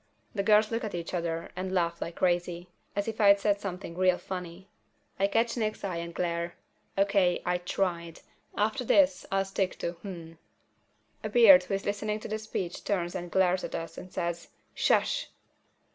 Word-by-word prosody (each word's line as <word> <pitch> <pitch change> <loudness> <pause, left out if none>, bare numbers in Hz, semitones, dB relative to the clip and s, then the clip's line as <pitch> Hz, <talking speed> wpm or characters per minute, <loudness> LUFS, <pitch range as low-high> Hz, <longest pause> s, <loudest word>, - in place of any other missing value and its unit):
The 200 - 0
girls 215 +1 +4
look 230 +2 -1
at 210 -4 -3
each 170 0 -5
other 165 -2 -2
and 185 +1 -3
laugh 170 -2 0
like 170 - -4
crazy, 175 -1 0 0.3
as 200 +1 -1
if 220 -1 -3
I'd 200 -1 +7
said 205 0 +1
something 180 -3 -5
real 185 0 +3
funny. 180 0 -7 0.5
I 195 - +4
catch 230 +3 +1
Nick's 215 -3 -2
eye 185 -4 -2
and 170 0 -5
glare. 170 0 -2 0.4
O.K., 195 -3 +3
I 180 0 +1
tried. 175 -2 -2 0.4
After 220 +5 +1
this 280 +4 +3
I'll 195 0 +2
stick 195 -1 -1
to 170 - -2
"Hmm." 170 -2 -9 0.9
A 215 - -2
beard 205 -5 +8
who 195 - -1
is 195 - -5
listening 210 +1 -1
to - - -6
the 215 +1 -3
speech 190 -5 -4
turns 175 -4 -1
and 175 -1 -5
glares 185 0 +2
at - - -4
us 165 0 -5
and 185 - -9
says, 170 -2 -3 0.3
"Shush!" - - +1
185 Hz, 180 wpm, -29 LUFS, 175-205 Hz, 0.9 s, beard